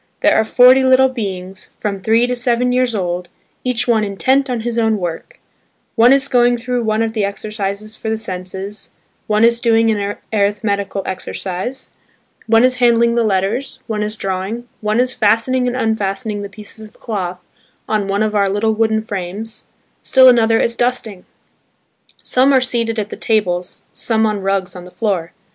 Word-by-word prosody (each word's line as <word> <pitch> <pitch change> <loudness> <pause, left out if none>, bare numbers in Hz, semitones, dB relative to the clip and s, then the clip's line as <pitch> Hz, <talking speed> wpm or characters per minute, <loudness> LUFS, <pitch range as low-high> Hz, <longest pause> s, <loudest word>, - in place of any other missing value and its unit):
There - - +4
are - - +4
forty 250 +4 +6
little 260 0 +5
beings–from 195 -2 -6
three 225 +4 +3
to 250 0 -1
seven 245 0 +1
years 250 -2 +1
old, 175 -2 -3 0.3
each 250 -1 0
one 225 -3 +3
intent 260 +7 +1
on 245 -2 -2
his 235 0 -2
own 220 -1 +2
work; 175 -4 -6 0.5
one 240 +1 +5
is 275 0 +3
going 245 -1 +3
through 245 0 -2
one 215 +1 +1
of 225 -1 -2
the 215 -2 -1
exercises 205 +1 -4
for 220 - -5
the 220 - 0
senses, 190 0 -6 0.4
one 215 +1 +2
is 235 0 +3
doing 225 -2 +3
an 205 -1 -2 0.2
arithmetical 200 -1 -1
exercise; 190 +6 -5 0.6
one 225 +1 +5
is 255 0 +3
handling 235 -1 +4
the 235 0 +2
letters, 210 +6 -1
one 215 -2 -3
is 210 +1 -3
drawing, 195 +4 -4
one 215 +2 0
is 250 0 +1
fastening 230 +4 +2
and 245 - -1
unfastening 210 -2 -1
the 200 - -6
pieces 215 +1 -10
of - - -23
cloth 185 -6 -4 0.5
on 210 -2 0
one 200 +2 0
of 215 -1 -1
our 200 -2 +2
little 215 +3 +1
wooden 220 0 +1
frames, 205 +1 -5 0.4
still 260 -1 +5
another 225 -2 +5
is 235 - +1
dusting. 235 -6 -2 1.0
Some 260 +2 +3
are 265 - +6
seated 235 -3 -1
at 210 -1 -2
the - - -6
tables, 180 -5 -1
some 225 -1 +1
on 210 -2 -1
rugs 195 -1 -1
on 180 - -8
the - - -11
floor. 180 -5 -2
220 Hz, 175 wpm, -17 LUFS, 200-240 Hz, 1.0 s, forty